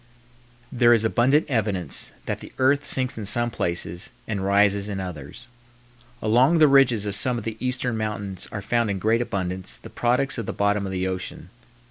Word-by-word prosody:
There 120 Hz, -2 st, +5 dB
is 115 Hz, -, +1 dB
abundant 125 Hz, +7 st, +3 dB
evidence 105 Hz, -, -1 dB
that -, -, -3 dB
the -, -, -10 dB
earth 140 Hz, +2 st, +2 dB
sinks 130 Hz, -3 st, +1 dB
in 105 Hz, -, -5 dB
some 120 Hz, +2 st, +2 dB
places 85 Hz, +4 st, -3 dB, 0.2 s
and 100 Hz, -3 st, -3 dB
rises 100 Hz, +1 st, +2 dB
in 100 Hz, -2 st, -4 dB
others. 90 Hz, -, -8 dB, 0.8 s
Along 125 Hz, +9 st, +4 dB
the 155 Hz, -1 st, +6 dB
ridges 135 Hz, -6 st, +4 dB
of 100 Hz, -, -2 dB
some 125 Hz, +4 st, +1 dB
of -, -, -5 dB
the 115 Hz, -1 st, -4 dB
eastern 125 Hz, -2 st, -1 dB
mountains 100 Hz, -3 st, -4 dB
are 100 Hz, -1 st, -5 dB
found 120 Hz, -2 st, 0 dB
in 100 Hz, -, -1 dB
great 110 Hz, +5 st, +1 dB
abundance 95 Hz, -5 st, -3 dB
the -, -, -12 dB
products 125 Hz, +2 st, 0 dB
of 115 Hz, -, -5 dB
the -, -, -3 dB
bottom 100 Hz, -1 st, 0 dB
of -, -, -5 dB
the 95 Hz, 0 st, -2 dB
ocean. 95 Hz, -2 st, -5 dB
110 Hz, 185 wpm, -24 LUFS, 95-125 Hz, 0.8 s, the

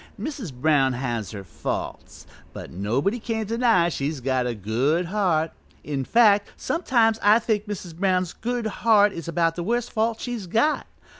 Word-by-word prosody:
Mrs. 250 Hz, -, -5 dB
Brown 135 Hz, 0 st, +2 dB
has 120 Hz, -4 st, -3 dB
her 100 Hz, -3 st, -7 dB
faults, 90 Hz, -, -6 dB, 0.3 s
but -, -, -8 dB
nobody 125 Hz, -, -1 dB
can't 220 Hz, -1 st, -3 dB
deny 230 Hz, -5 st, +3 dB
as 170 Hz, -, -1 dB
she's 140 Hz, +1 st, -2 dB
got 130 Hz, -1 st, 0 dB
a 120 Hz, -, -2 dB
good 125 Hz, -, 0 dB
heart, 170 Hz, -4 st, 0 dB, 0.3 s
in 140 Hz, -3 st, -3 dB
fact, 210 Hz, -, +4 dB
sometimes 230 Hz, -9 st, +1 dB
I 210 Hz, +2 st, +6 dB
think 215 Hz, -2 st, -1 dB
Mrs. 185 Hz, -5 st, -6 dB
Brown's 185 Hz, -1 st, 0 dB
good 240 Hz, 0 st, -3 dB
heart 210 Hz, -1 st, +3 dB
is 170 Hz, 0 st, -7 dB
about 165 Hz, 0 st, +1 dB
the 175 Hz, -, -3 dB
worst 240 Hz, +5 st, -1 dB
fault 225 Hz, 0 st, 0 dB
she's 240 Hz, -6 st, -5 dB
got. 230 Hz, -, +1 dB
185 Hz, 165 wpm, -24 LUFS, 140-225 Hz, 0.3 s, I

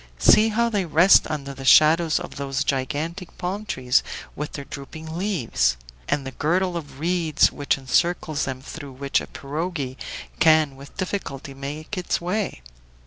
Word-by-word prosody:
See 220 Hz, -, +6 dB
how 235 Hz, +2 st, +1 dB
they 205 Hz, -4 st, 0 dB
rest 170 Hz, +3 st, +5 dB
under 140 Hz, -3 st, -4 dB
the 135 Hz, -, -9 dB
shadows 155 Hz, +4 st, +6 dB
of -, -, -8 dB
those 140 Hz, 0 st, -1 dB
gigantic 155 Hz, +7 st, -3 dB
palm 195 Hz, +4 st, -4 dB
trees 125 Hz, -5 st, +2 dB, 0.3 s
with 150 Hz, +1 st, -5 dB
their 140 Hz, -, -6 dB
drooping 160 Hz, +4 st, -8 dB
leaves! 175 Hz, -, 0 dB, 0.3 s
And 140 Hz, -2 st, 0 dB
the 135 Hz, -, -5 dB
girdle 175 Hz, +6 st, 0 dB
of 145 Hz, -5 st, -7 dB
reeds 165 Hz, -2 st, +2 dB
which 145 Hz, -1 st, 0 dB
encircles 155 Hz, +3 st, 0 dB
them 130 Hz, -1 st, -5 dB
through 140 Hz, -2 st, -8 dB
which 140 Hz, +1 st, 0 dB
a -, -, -8 dB
pirogue 145 Hz, -1 st, -4 dB, 0.4 s
can 155 Hz, -3 st, +4 dB
with 140 Hz, +1 st, -13 dB
difficulty 180 Hz, -8 st, -4 dB
make 150 Hz, +7 st, -5 dB
its 180 Hz, -, -1 dB
way! 180 Hz, -, -2 dB
155 Hz, 155 wpm, -24 LUFS, 140-175 Hz, 0.4 s, See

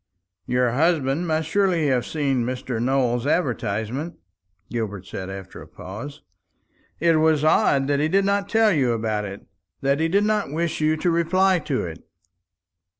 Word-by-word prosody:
"Your 125 Hz, -1 st, +2 dB
husband 155 Hz, +2 st, +1 dB
must 160 Hz, -1 st, 0 dB
surely 180 Hz, -2 st, +1 dB
have 125 Hz, -2 st, 0 dB
seen 140 Hz, -5 st, 0 dB
Mr. 125 Hz, -1 st, -3 dB
Nowell's 125 Hz, -1 st, +1 dB
advertisement," 125 Hz, -, -1 dB, 0.5 s
Gilbert 105 Hz, -5 st, -4 dB
said 95 Hz, 0 st, -6 dB
after 95 Hz, -1 st, -8 dB
a -, -, -11 dB
pause. 130 Hz, +10 st, -9 dB, 0.8 s
"It 165 Hz, 0 st, +3 dB
was 155 Hz, -1 st, +3 dB
odd 140 Hz, -3 st, +3 dB
that 140 Hz, 0 st, +1 dB
he 150 Hz, -, +2 dB
did 195 Hz, +4 st, +2 dB
not 200 Hz, 0 st, 0 dB
tell 220 Hz, 0 st, +4 dB
you 135 Hz, -8 st, +2 dB
about 110 Hz, -2 st, -2 dB
it 100 Hz, 0 st, -8 dB, 0.4 s
that 140 Hz, +1 st, +1 dB
he 160 Hz, -, +2 dB
did 200 Hz, +5 st, +2 dB
not 210 Hz, -7 st, 0 dB
wish 165 Hz, +1 st, -2 dB
you 155 Hz, +1 st, +2 dB
to 175 Hz, +2 st, +1 dB
reply 185 Hz, +3 st, +2 dB
to 140 Hz, -, -2 dB
it." 85 Hz, -1 st, -8 dB
145 Hz, 160 wpm, -23 LUFS, 120-170 Hz, 0.8 s, tell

